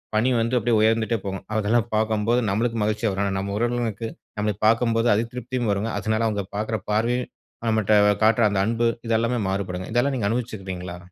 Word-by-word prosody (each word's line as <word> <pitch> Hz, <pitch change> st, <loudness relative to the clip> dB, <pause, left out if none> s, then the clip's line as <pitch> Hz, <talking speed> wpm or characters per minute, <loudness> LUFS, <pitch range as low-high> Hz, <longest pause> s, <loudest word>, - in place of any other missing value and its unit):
பணி 110 Hz, +4 st, +3 dB
வந்து 115 Hz, +2 st, 0 dB
அப்பிடியே 115 Hz, 0 st, +2 dB
உயர்ந்துட்டே 110 Hz, +1 st, +2 dB
போகும். 95 Hz, -1 st, -4 dB
அதெல்லாம் 110 Hz, +2 st, +1 dB
பாக்கும்போது 110 Hz, +2 st, +1 dB
நம்மளுக்கு 115 Hz, +4 st, 0 dB
மகிழ்ச்சியா 105 Hz, +1 st, 0 dB
வரும். 95 Hz, +1 st, -1 dB
ஆனா, 100 Hz, -, -1 dB
நம்ம 100 Hz, +1 st, -3 dB
உறவினர்களுக்கு 115 Hz, -1 st, -1 dB, 0.3 s
நம்மள 105 Hz, 0 st, 0 dB
பாக்கும்போது 115 Hz, 0 st, +2 dB
அதிருப்தியும் 120 Hz, +1 st, -2 dB
வருங்க. 100 Hz, +3 st, -1 dB
அதனால 110 Hz, +2 st, 0 dB
அவுங்க 100 Hz, -3 st, -2 dB
பாக்குற 110 Hz, +1 st, -2 dB
பார்வையும், 120 Hz, +4 st, 0 dB, 0.4 s
நம்மட்ட 110 Hz, -1 st, +3 dB, 0.3 s
காட்ற 115 Hz, +2 st, +4 dB
அந்த 95 Hz, -, +1 dB
அன்பு, 115 Hz, +1 st, +1 dB, 0.2 s
இது 115 Hz, -, +2 dB
எல்லாமே 120 Hz, +1 st, 0 dB
மாறுபடுங்க. 95 Hz, -2 st, -3 dB
இதெல்லாம் 130 Hz, +4 st, +2 dB
நீங்க 100 Hz, -, 0 dB
அனுபவிச்சுக்கீங்களா? 95 Hz, -7 st, -4 dB
110 Hz, 165 wpm, -24 LUFS, 105-115 Hz, 0.4 s, காட்ற